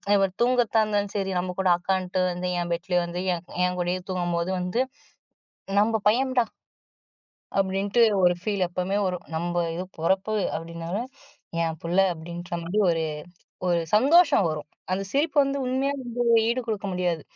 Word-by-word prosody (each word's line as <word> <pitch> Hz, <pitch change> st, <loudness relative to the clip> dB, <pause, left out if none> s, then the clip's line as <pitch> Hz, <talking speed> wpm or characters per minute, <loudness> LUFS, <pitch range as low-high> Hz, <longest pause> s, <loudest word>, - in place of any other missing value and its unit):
இவர் 195 Hz, -1 st, +2 dB
தூங்கர்தாந்தாலும் 215 Hz, -4 st, +2 dB
சரி, 195 Hz, -1 st, -1 dB
நம்ம 180 Hz, 0 st, -2 dB
கூட 190 Hz, -1 st, +2 dB
அக்கான்னுட்டு 185 Hz, +1 st, -1 dB
வந்து 180 Hz, +1 st, -3 dB
என் 175 Hz, -, -4 dB
பெட்லேயே 175 Hz, +1 st, 0 dB
வந்து 175 Hz, +1 st, -5 dB
என் 170 Hz, 0 st, -5 dB, 0.2 s
என் 180 Hz, 0 st, -1 dB
கூடயே 180 Hz, +1 st, 0 dB
தூங்கம்போது 175 Hz, -1 st, -1 dB
வந்து, 180 Hz, +6 st, -1 dB, 1.0 s
நம்ப 220 Hz, +1 st, +2 dB
பையம்டா. 255 Hz, +2 st, +2 dB, 1.2 s
அப்டின்ட்டு 195 Hz, +4 st, +1 dB, 0.2 s
ஒரு 180 Hz, 0 st, +6 dB
ஃபீல் 200 Hz, -2 st, 0 dB
எப்பவுமே 180 Hz, +3 st, -2 dB
வரும். 180 Hz, -2 st, -3 dB
நம்ப 175 Hz, +2 st, -2 dB, 0.2 s
இது 180 Hz, -, -3 dB
பொறப்பு 190 Hz, +6 st, +1 dB, 0.2 s
அப்டினாலும் 170 Hz, +8 st, -5 dB, 0.5 s
என் 160 Hz, -1 st, -2 dB
புள்ள 170 Hz, +2 st, -2 dB, 0.2 s
அப்டின்ற 170 Hz, +1 st, -8 dB
மாரி 180 Hz, +6 st, -1 dB
ஒரு 165 Hz, -1 st, +1 dB, 0.6 s
ஒரு 175 Hz, -1 st, +2 dB
சந்தோஷம் 285 Hz, -, +5 dB
வரும். 150 Hz, -1 st, -4 dB, 0.2 s
அந்த 190 Hz, +1 st, 0 dB
சிரிப்பு 290 Hz, +3 st, 0 dB
வந்து 275 Hz, 0 st, -1 dB
உண்மையா 260 Hz, +2 st, 0 dB
வந்து 245 Hz, -1 st, -3 dB, 0.2 s
ஈடு 240 Hz, +2 st, +1 dB
குடுக்க 215 Hz, -3 st, -2 dB
முடியாது. 175 Hz, -3 st, -1 dB
185 Hz, 145 wpm, -25 LUFS, 175-220 Hz, 1.2 s, ஒரு